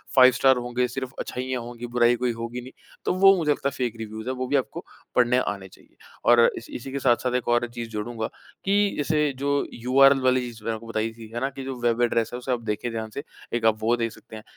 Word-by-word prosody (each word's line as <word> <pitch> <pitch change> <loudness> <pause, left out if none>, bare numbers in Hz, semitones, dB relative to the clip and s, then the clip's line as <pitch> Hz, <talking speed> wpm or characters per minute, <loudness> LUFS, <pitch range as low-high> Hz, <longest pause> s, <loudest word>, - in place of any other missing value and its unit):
5 130 -1 +8
star 130 0 +4
होंगे, 125 +1 -1
सिर्फ 130 +1 -5
अच्छाइयाँ 130 0 -3
होंगी, 120 0 -7
बुराई 120 0 +3
कोई 125 0 0
होगी 115 +2 -5
नहीं, 130 +2 -11 0.3
तो - - +2
वो 195 +1 +6
मुझे 155 -4 +1
लगता 140 -1 0
है - - -11
फेक 120 -3 -1
रिव्यूज़ 110 +1 -7
हैं 130 - -2
वो 130 0 -3
भी 140 - 0
आपको 135 - -2 0.3
पढ़ने 125 0 +4
आने 100 -5 -3
चाहिए। - - -21 0.3
और 120 0 +6 0.2
इसी 115 - -9
इसी 130 +2 -6
के 140 - -2
साथ-साथ 125 0 +2
एक 125 - -1
और 120 0 +2
चीज़ 120 -1 -5
जोड़ूँगा, 110 +1 -3 0.4
कि 200 +1 +2
जैसे 150 0 +1
जो 140 +1 +1 0.2
यूआरएल 135 +3 +5
वाली 130 0 +3
चीज़ 120 -3 -8
मैंने 115 - -1
आपको 115 +1 -10
बताई 115 0 -1
थी, 115 -1 -11
है 120 - -2
ना? 135 - 0
कि 135 0 -8
जो 135 0 -4
वेब 120 0 +1
एड्रेस 115 -2 +2
है - - -3
उसे 125 +1 -4
आप 120 -2 0
देखें 105 +3 -1
ध्यान 110 -1 -4
से 140 - -5 0.3
एक 120 -1 0
आप 110 -1 +4
वो 115 +2 +3
देख 115 -1 -1
सकते 110 - -13
हैं। 110 - -9
120 Hz, 250 wpm, -25 LUFS, 115-130 Hz, 0.4 s, 5